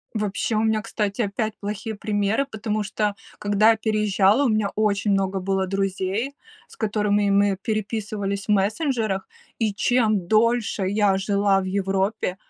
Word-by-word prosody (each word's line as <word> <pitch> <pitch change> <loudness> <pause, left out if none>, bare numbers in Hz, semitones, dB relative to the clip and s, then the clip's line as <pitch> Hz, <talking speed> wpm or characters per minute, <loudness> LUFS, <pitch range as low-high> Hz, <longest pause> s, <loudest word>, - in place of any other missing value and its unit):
Вообще, 215 +1 -1
у 215 - +2
меня, 220 -1 +1
кстати, 210 -1 -2
опять 215 +1 -2
плохие 210 +2 -4
примеры, 205 +4 0
потому 215 0 -2
что, 205 0 -1 0.2
когда 205 +2 +4
я 225 - +3
переезжала, 215 +2 +2
у - - +3
меня 215 -2 +1
очень 205 -1 +1
много 195 0 0
было 190 0 0
друзей, 195 +6 -2 0.3
с - - -16
которыми 210 -2 +1
мы 200 0 +3
переписывались 210 -2 -3
в - - -3
мессенджерах, 210 -1 0 0.3
и 220 -3 +1
чем 215 -4 +1
дольше 225 -1 +2
я 200 0 +2
жила 200 0 +2
в - - -4
Европе, 195 0 -1
205 Hz, 150 wpm, -23 LUFS, 195-220 Hz, 0.3 s, когда